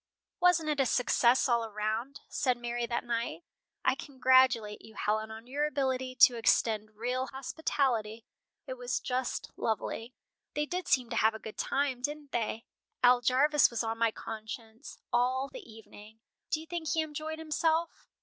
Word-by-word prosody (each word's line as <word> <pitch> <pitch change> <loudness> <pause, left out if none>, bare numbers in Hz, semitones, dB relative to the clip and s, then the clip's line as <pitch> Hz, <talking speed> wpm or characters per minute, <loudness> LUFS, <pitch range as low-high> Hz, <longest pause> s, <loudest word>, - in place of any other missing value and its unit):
"Wasn't 350 -3 +4
it 300 -2 0
a 270 - +3
success 245 +1 +3
all 235 -2 +1
round?" 220 +6 -3
said 255 -3 0
Mary 240 0 -3
that 235 0 -2
night. 235 +6 -3 0.4
"I - - +5
congratulate 260 -5 +3
you, 220 - -15
Helen, 215 +1 -1
on 220 +1 -9
your 290 +4 -1
ability 260 -3 -1
to 250 -4 +8
extend 215 -2 +1
real 250 +4 -2
hospitality. 255 -5 -1 0.4
It - - -7
was - - -1
just 255 0 -3
lovely." 225 +2 -3 0.4
"They 295 0 +1
did 360 +3 -4
seem 250 -6 +2
to 230 - -1
have 220 0 +3
a - - -4
good 220 -1 -10
time, 270 -3 0
didn't 290 +1 -4
they? 225 0 -2 0.4
Al 245 0 +6
Jarvis 280 +5 +4
was 235 -1 -2
on 225 0 -3
my 230 0 +4
conscience 220 +1 -8 0.2
all 255 +3 +2
the 455 - -10
evening. 220 0 -14 0.3
Do 310 - 0
you - - -10
think 340 -1 -5
he 320 - +2
enjoyed 310 +1 -5
himself?" 320 +1 -1
250 Hz, 165 wpm, -30 LUFS, 225-290 Hz, 0.4 s, to